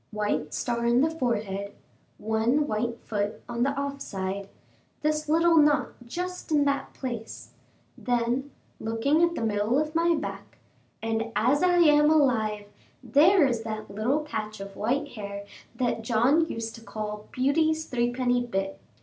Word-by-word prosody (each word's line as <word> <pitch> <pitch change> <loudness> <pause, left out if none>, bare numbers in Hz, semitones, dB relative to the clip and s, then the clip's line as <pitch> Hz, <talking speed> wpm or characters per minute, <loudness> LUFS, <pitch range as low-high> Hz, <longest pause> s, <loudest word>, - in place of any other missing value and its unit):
"White 210 -8 -2
star 235 -1 -1
in 240 +2 +4
the 315 +2 +2
forehead, 210 -9 -2 0.4
one 225 +7 +1
white 235 -1 -2
foot 210 0 -3
on 235 0 -3
the 265 - +3
off 280 0 -4
side, 195 0 -4 0.5
this 305 0 0
little 330 +1 +4
knot 295 -1 +4 0.2
just 360 +5 -5
in 290 -2 +4
that 280 0 -1
place"; 235 -4 -6 0.4
then, 245 +2 -1 0.3
looking 230 +8 +1
at 340 0 +3
the - - -3
middle 215 +3 +1
of 305 +1 0
my 335 +1 +3
back - - -6 0.5
"and 225 0 -1
as 250 +7 +3
I 360 -1 +4
am 295 -2 +6
alive, 225 -9 +2 0.4
there 325 +4 +5
is 240 -4 0
that 215 -1 -6
little 245 +9 +1
patch 215 -8 -5
of 195 0 -8
white 270 +8 -1
hair 200 -4 -7 0.3
that 245 -3 -1
John 245 +8 +3
used 225 0 -4
to 230 - -11
call 210 -2 -6
'Beauty's 315 +4 +1
threepenny 245 0 0
bit.' 195 -5 -3
240 Hz, 150 wpm, -27 LUFS, 215-295 Hz, 0.5 s, am